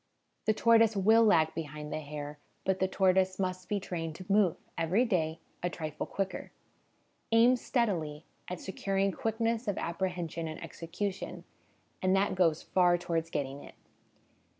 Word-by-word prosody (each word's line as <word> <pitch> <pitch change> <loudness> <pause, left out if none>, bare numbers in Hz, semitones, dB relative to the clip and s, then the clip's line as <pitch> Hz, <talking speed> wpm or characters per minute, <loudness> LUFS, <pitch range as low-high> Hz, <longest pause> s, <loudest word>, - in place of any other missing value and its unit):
The 215 - +5
tortoise 230 -1 +5
will 220 +4 +6
lag 160 -7 +4
behind 150 -1 -5
the - - -1
hare, 145 0 -7 0.3
but 190 0 +1
the 190 - +2
tortoise 190 0 +2
must 185 -1 -3
be 205 - +1
trained 165 -4 -4
to 185 - -9
move, 200 -4 +4 0.2
every 175 +9 +2
day, 165 -7 0 0.2
a 175 - 0
trifle 155 -3 -5
quicker. 195 -1 -3 0.8
Aim 235 +3 +6
steadily 175 - -1 0.2
at 180 - -5
securing 195 0 -1
quickness 230 0 -1
of 205 - 0
apprehension 170 -2 -2
and 155 - -6
execution, 190 +4 -5 0.6
and 185 +1 +3
that 195 +1 +2
goes 170 -4 +2
far 175 -1 +3
towards 165 -1 -2
getting 140 -2 -3
it. - - -13
185 Hz, 150 wpm, -31 LUFS, 165-205 Hz, 0.8 s, will